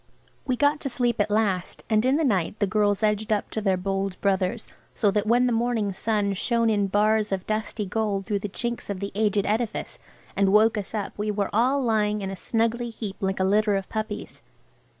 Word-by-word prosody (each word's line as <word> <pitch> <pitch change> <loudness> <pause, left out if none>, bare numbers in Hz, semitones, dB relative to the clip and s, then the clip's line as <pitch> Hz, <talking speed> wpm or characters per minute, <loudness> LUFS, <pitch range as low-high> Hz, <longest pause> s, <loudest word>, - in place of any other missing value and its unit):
We 255 - +1
got 290 +3 +2
to 275 - -3
sleep 240 -3 0
at 205 - 0
last, 205 -4 0
and 215 -1 +2
in 260 +2 +3
the 320 - +1
night 205 - 0
the 205 - +1
girls 205 +1 +1
edged 215 +1 +1
up 210 -1 0
to 220 - -2
their 195 -3 +2
bold 195 0 -2
brothers, 195 +3 0 0.3
so 205 - +2
that 210 +1 0
when 240 +2 +4
the 250 - +2
morning 225 -3 0
sun 205 0 0
"shone 230 +4 +1
in 205 -2 +1
bars 210 +1 +2
of 190 -1 -2
dusty 215 0 -2
gold 200 -1 -1
through 205 -2 -1
the 205 - -5
chinks 235 +3 -4
of 200 -2 -3
the 200 +1 -4
aged 205 -1 +1
edifice" 220 +2 -2 0.4
and 195 -1 +3
woke 215 +2 +5
us 210 +1 -4
up 205 -2 -3
we 210 +1 -1
were 205 -1 -1
all 260 +6 +2
lying 210 -3 +1
in 195 0 -3
a - - -5
snuggly 230 +4 -1
heap 215 -3 -6
like 190 -2 -1
a - - +2
litter 205 +2 +3
of 195 -1 -3
puppies. 215 -1 -5
210 Hz, 215 wpm, -25 LUFS, 200-225 Hz, 0.4 s, woke